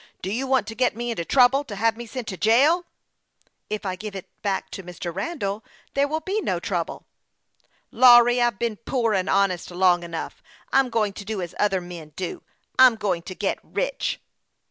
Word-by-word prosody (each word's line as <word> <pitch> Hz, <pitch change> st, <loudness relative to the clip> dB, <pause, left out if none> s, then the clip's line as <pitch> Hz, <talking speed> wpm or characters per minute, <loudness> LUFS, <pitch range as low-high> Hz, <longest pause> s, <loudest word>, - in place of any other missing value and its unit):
Do 190 Hz, -, -2 dB
you 265 Hz, +4 st, -2 dB
want 260 Hz, -4 st, +2 dB
to 225 Hz, -, -6 dB
get 250 Hz, -2 st, +1 dB
me 240 Hz, +1 st, -3 dB
into 195 Hz, -7 st, -3 dB
trouble 265 Hz, +7 st, +4 dB
to 215 Hz, -6 st, -7 dB
have 225 Hz, +3 st, +1 dB
me 235 Hz, 0 st, -8 dB
sent 235 Hz, +1 st, -6 dB
to 190 Hz, -, -4 dB
jail? 280 Hz, -, +4 dB, 0.3 s
" -, -, -52 dB
" -, -, -41 dB
If 215 Hz, 0 st, -4 dB
I 185 Hz, -1 st, -2 dB
give 210 Hz, +1 st, -7 dB
it 190 Hz, -, -7 dB
back 200 Hz, -3 st, -2 dB
to -, -, -6 dB
Mr. 175 Hz, -1 st, -7 dB
llandall, 200 Hz, -, -3 dB, 0.3 s
there 280 Hz, +1 st, +2 dB
will 315 Hz, +2 st, -2 dB
be 395 Hz, +6 st, -2 dB
no -, -, -1 dB
trouble." -, -, -3 dB, 0.5 s
" -, -, -40 dB
Lawry, 245 Hz, 0 st, +7 dB
I've 240 Hz, -4 st, +2 dB
been 230 Hz, -1 st, -2 dB
poor 230 Hz, -1 st, -1 dB
and 190 Hz, -1 st, 0 dB
honest 195 Hz, -3 st, +1 dB
long 180 Hz, 0 st, +3 dB
enough. 170 Hz, -1 st, -6 dB, 0.3 s
I'm 270 Hz, -1 st, +4 dB
going 215 Hz, -3 st, 0 dB
to 200 Hz, -, -8 dB
do 215 Hz, 0 st, -4 dB
as 175 Hz, -2 st, -5 dB
other 195 Hz, -3 st, +2 dB
men 170 Hz, -4 st, -10 dB
do. 185 Hz, -2 st, -5 dB, 0.4 s
I'm 255 Hz, -3 st, +8 dB
going 195 Hz, -6 st, -1 dB
to 185 Hz, +2 st, -8 dB
get -, -, -1 dB
rich." -, -, -2 dB
220 Hz, 210 wpm, -24 LUFS, 190-250 Hz, 0.5 s, I'm